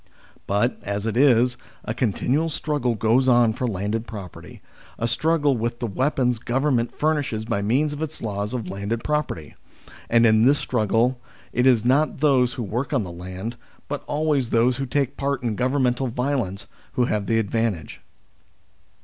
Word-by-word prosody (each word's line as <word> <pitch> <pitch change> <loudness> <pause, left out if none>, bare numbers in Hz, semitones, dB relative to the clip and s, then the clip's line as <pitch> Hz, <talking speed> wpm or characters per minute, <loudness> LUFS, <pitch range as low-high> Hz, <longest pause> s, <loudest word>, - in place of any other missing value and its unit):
But, 105 +5 +1
as 100 +1 -3
it 110 - -1
is, 125 -2 +4 0.3
a 110 - -2
continual 130 +7 0
struggle 145 -6 -1
goes 115 +5 +2
on 120 -3 +5
for 125 +2 -2
landed 105 +2 -2
property; 100 -6 -9 0.4
a 115 - -1
struggle 145 +3 +2
with 120 +1 -2
the 120 - -2
weapons 125 +1 0
Govern 130 +3 +1
ment 115 0 -3
furnishes 145 -8 0
by 100 - -1
means 135 +9 +1
of 145 - -7
its 160 0 -4
laws 105 -1 -3
of 115 -6 -4
landed 100 +5 -3
property. 150 - -2 0.6
And 115 0 +5
in 110 -1 +5
this 140 +4 +5
struggle 120 +1 +1 0.3
it 125 +2 +3
is 120 -4 +4
not 140 +5 +2
those 130 -4 +3
who 120 - -4
work 120 +8 -3
on 130 -6 +2
the 90 - -7
land, 95 +7 -6 0.3
but - - -4
always 145 -4 0
those 120 +2 +2
who 135 0 -3
take 140 0 -1
part 140 -2 -1
in 115 -3 0
governmental 130 0 +1
violence, 125 -5 -2 0.3
who 125 - +2
have 105 -4 -1
the 115 - +2
advantage. 110 -6 -2
120 Hz, 170 wpm, -23 LUFS, 110-135 Hz, 0.6 s, on